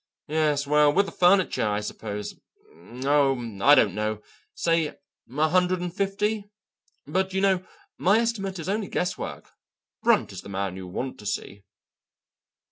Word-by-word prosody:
Yes, 150 -2 +1
well 150 0 +4
with 200 +6 +3
the - - -7
furniture, 180 - +3
I 105 0 0
suppose 105 0 -5 0.7
oh, 135 -7 +1
I 145 +5 +8
don't 100 -9 +4
know 105 +1 -2 0.3
say, 165 -2 0 0.3
a 150 +4 +1
hundred 180 +1 +2
and 175 -1 -4
fifty. 205 +1 -1 0.6
But, 190 +5 -1
you 190 - +1
know, 190 -2 +2 0.4
my 200 +4 +4
estimate 215 -5 -1
is 165 -1 -6
only 205 +1 -1
guesswork. 180 - -4 0.5
Brunt - - +3
is - - -7
the - - -11
man 95 -1 -3
you 95 -1 -8
want 125 +8 -5
to 105 - -8
see." 100 -1 -5
155 Hz, 150 wpm, -26 LUFS, -, 0.7 s, I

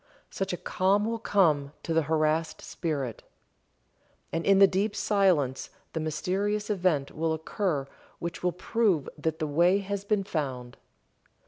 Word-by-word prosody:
Such 195 - -2
a 180 - -2
calm 195 +4 +1
will 230 +1 -2
come 155 -10 +2
to 165 - -2
the 165 - +4
harassed 155 +1 0
spirit. 140 -8 -3 1.1
And 165 +1 -2
in 195 -1 +6
the 195 - +9
deep 195 +2 0
silence 180 -11 +1 0.2
the 160 - -2
mysterious 195 +7 -1
event 175 -8 +1
will 160 +1 0
occur 160 -2 -2 0.3
which 170 -1 -5
will 180 - +1
prove 190 - +1
that 160 +1 -2
the 160 - -2
way 170 +6 +3
has 200 0 -3
been 205 -1 +1
found. 130 -9 -4
170 Hz, 145 wpm, -28 LUFS, 155-195 Hz, 1.1 s, the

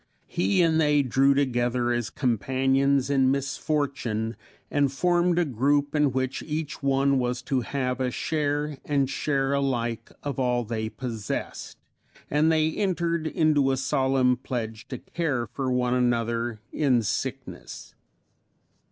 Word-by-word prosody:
He 100 - +1
and 160 -1 +3
they 150 -2 +3
drew 135 +2 +3
together 120 -3 +1
as 120 -2 -1
companions 135 +3 +1
in 135 -2 +4
misfortune, 135 -5 -1 0.4
and 145 -2 +2
formed 175 +3 +2
a 175 - +3
group 145 +2 +1
in 150 -2 +3
which 130 0 -2
each 155 -1 -4
one 140 0 +2
was 125 0 -2
to 135 - 0
have 125 0 -2
a 130 - +1
share 145 +1 -2
and 140 -2 +1
share 135 0 0
alike 120 -5 -1
of 140 -2 -3
all 125 -1 +1
they 110 -1 -3
possessed; 115 -6 -5 0.5
and 150 +2 +3
they 160 0 +2
entered 170 -4 -1
into 155 -4 +2
a 135 - +1
solemn 130 -1 +2
pledge 115 -3 -5
to 130 - -5
care 145 -5 -2
for 130 +4 -3
one 125 -1 +1
another 120 -2 0
in 130 -6 +2
sickness. - - -5
135 Hz, 135 wpm, -26 LUFS, 120-145 Hz, 0.5 s, in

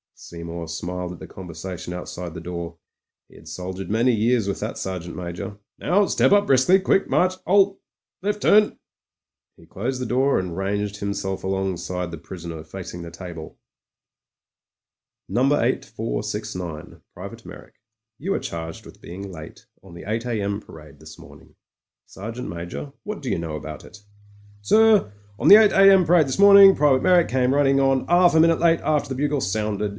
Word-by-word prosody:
Seymour 85 0 -8
smiled 90 +2 -5
at 90 - -12
the - - -9
conversation 90 0 -8
outside 90 -1 -7
the - - -6
door; 85 0 -7 0.5
he - - -21
had - - -16
soldiered 95 +1 -6
many 115 +4 +2
years 115 0 +1
with 100 - -3
that - - -5
Sergeant 90 -2 -5
Major. 90 +3 -6 0.2
"Now, 200 +3 +2
step - - +2
up 205 0 +5
briskly. 135 +9 +4
Quick 195 0 +1
march. 185 +1 +2
'Alt 195 +1 +3 0.4
Left 205 +2 -2
turn." 210 0 +4 0.8
He - - -18
closed 125 +6 -4
the - - -2
door 135 +3 +2
and 90 -2 -5
ranged 100 +2 -2
himself 100 -1 -4
alongside 90 -2 -3
the 85 - -8
prisoner 85 -3 -8
facing 90 +1 -8
the 85 - -8
table. 85 -2 -9 1.7
"No. 120 - -1 0.2
8469, 80 +6 -4
Private - - -9
Meyrick - - -13 0.3
— 110 +2 -35
^you 195 +5 -1
are - - -1
charged 80 -1 -7
with - - -15
being 95 +3 -8
late 80 -3 -11 0.2
on 95 -3 -15
the 85 - -10
8 115 +3 -2
a.m. 100 -3 -2
parade 75 -5 -15
this - - -13
morning. - - -16 0.5
Ser 105 +4 -8
geant 125 +2 -7
Major, 85 - -7
what 210 -4 -6
do 130 - -3
you - - 0
know 80 -2 -5
about 75 0 -8
it?" - - -14 0.6
"Sir, 215 - +4 0.3
on - - 0
the - - +11
8 215 -1 +6
a.m. 195 -2 +6
parade 165 -3 +4
this 130 - -3
morning. 200 -1 +8
Private 140 -3 +3
Meyrick 180 -2 +4
came 130 +1 +1
running 135 -1 +3
on 135 -1 +1
'alf 175 -1 +4
a - - +6
minute 165 0 +4 0.2
after 150 -1 0
the 130 - -3
bugle 145 +1 -1
sounded. 105 0 -2
100 Hz, 170 wpm, -23 LUFS, 90-145 Hz, 1.7 s, the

